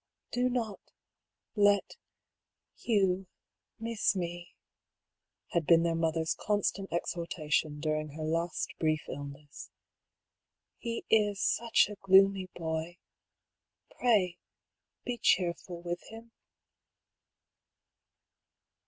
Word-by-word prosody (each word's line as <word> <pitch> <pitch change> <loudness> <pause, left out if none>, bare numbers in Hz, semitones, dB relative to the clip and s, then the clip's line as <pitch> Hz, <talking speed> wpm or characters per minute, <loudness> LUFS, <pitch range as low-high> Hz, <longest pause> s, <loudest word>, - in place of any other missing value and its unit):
" - - -53
Do 250 +1 +2
not 230 -5 -2 0.8
let 205 -1 +3 0.4
— - - -59
Hugh 195 -4 +2 0.3
— - - -56
miss 225 -2 0
me," 175 -1 -5 1.0
had 170 -3 0
been 165 -1 +6
their 170 -1 +1
mother's 165 -1 0
constant 200 -2 -1
exhortation 160 -3 -1
during 155 -1 -2
her 155 +1 -6
last 165 +2 -1
brief 155 -1 +1
illness. 145 +1 -8 0.5
" - - -59
He 230 -1 -4
is 210 -2 +3
such 230 +2 +3
a 210 0 -8
gloomy 195 0 +5
boy. 160 +1 -3 0.9
Pray 195 -8 +2 0.7
be 245 -1 -3
cheerful 175 -1 +1
with 175 0 -3
him." 225 +1 -11
175 Hz, 100 wpm, -31 LUFS, 160-205 Hz, 1.0 s, been